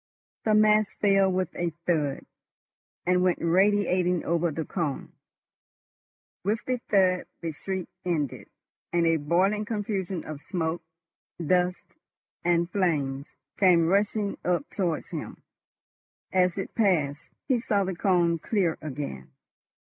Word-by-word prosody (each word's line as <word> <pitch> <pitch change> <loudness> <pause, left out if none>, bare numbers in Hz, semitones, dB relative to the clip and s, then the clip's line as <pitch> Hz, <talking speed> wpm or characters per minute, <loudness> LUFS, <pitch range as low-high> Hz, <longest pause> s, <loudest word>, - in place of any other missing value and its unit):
The 215 -1 +4
mass 215 -1 +4
fell 195 -2 +3
with 185 -1 -1
a 175 -1 -1 0.2
thud, 150 -5 0 0.8
and 180 0 +3
went 180 -1 +2
radiating 180 -1 +2
over 170 +1 +1
the 160 0 -4
cone. 160 -7 -3 1.3
With 210 +3 -1
the 255 -1 -1
thud 185 -2 +3
the 165 -1 -3
shriek 190 +4 -4 0.2
ended, 155 -7 -2 0.4
and 170 -1 +2
a 165 0 +3
boiling 185 +8 +1
confusion 200 -5 -3
of 150 -2 -7
smoke, 165 -1 -2 0.6
dust, 180 +2 +1 0.6
and 170 0 +2
flame 145 -8 0 0.3
came 180 -4 +5
rushing 205 +1 +1
up 180 +11 0
towards 175 -6 -2
him. - - -6 0.9
As 180 -1 +3
it 195 - -4
passed, 160 - +1 0.2
he 260 -3 +2
saw 205 -4 +1
the 190 -1 -3
cone 170 -2 +2
clear 185 -3 0
again. 140 - -6
180 Hz, 125 wpm, -27 LUFS, 165-195 Hz, 1.3 s, came